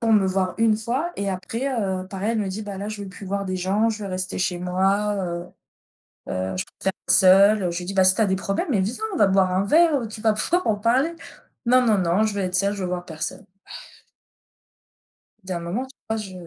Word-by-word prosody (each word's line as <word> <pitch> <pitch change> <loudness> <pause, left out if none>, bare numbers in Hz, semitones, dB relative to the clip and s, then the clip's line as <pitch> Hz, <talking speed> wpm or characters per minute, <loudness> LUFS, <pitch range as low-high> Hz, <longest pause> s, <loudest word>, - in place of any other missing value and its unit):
pour 225 -1 +2
me 200 -3 +4
voir 185 -1 0
1 225 -2 +4
fois 255 +10 -2
et 200 0 -2
après, 225 +7 -4
heu, 190 -7 -2
pareil, 200 +3 -2
elle 225 - -1
me 200 -2 -1
dit: 195 +3 -4
«Bah, 200 -2 -6
là, 200 +2 -5
je 215 -1 -6
veux 195 - -7
plus 195 +1 -10
voir 200 0 -2
des 185 0 -2
gens, 200 +5 +1
je 215 -2 -3
veux 195 - -5
rester 185 0 -3
chez 180 -1 -1
moi, 195 +3 +1
heu, 175 -2 -3 0.8
heu, 95 0 -3
je - - -2 0.2
préfère 190 - +1 0.2
être - - +3
seule, 195 +2 +6
heu». 175 - 0
Je 170 - -3
lui 180 - -6
dis: 195 +2 -5
«Bah, 190 - +4
si 185 - +5
tu - - -1
as 215 - +4
des 190 - +1
problèmes, 195 +1 -2
mais 210 - +2
viens, 220 - -2
on - - -2
va 205 - +5
boire 190 -1 +3
un 190 +2 +1
verre, 310 +5 +4
heu, 225 - -5
tu 215 0 -9
vas 220 0 +3
pouvoir 345 +12 0
en 215 -2 +2
parler». 255 +10 +1 0.5
«Non, 250 +2 +5
non, 220 -2 +4
non, 185 +3 +2
je 215 - -1
veux 200 - -2
être 185 -1 -1
seule, 200 +2 +1
je 200 - -5
veux 180 - -2
voir 180 0 -3
personne». 160 -2 -6 2.0
Il 190 - -11
y - - 0
a 175 - -2
un - - -4
moment, 185 +10 -3
tu 260 -1 -19
vois, 220 - 0
je 210 -3 -6
200 Hz, 265 wpm, -23 LUFS, 185-220 Hz, 2.0 s, seule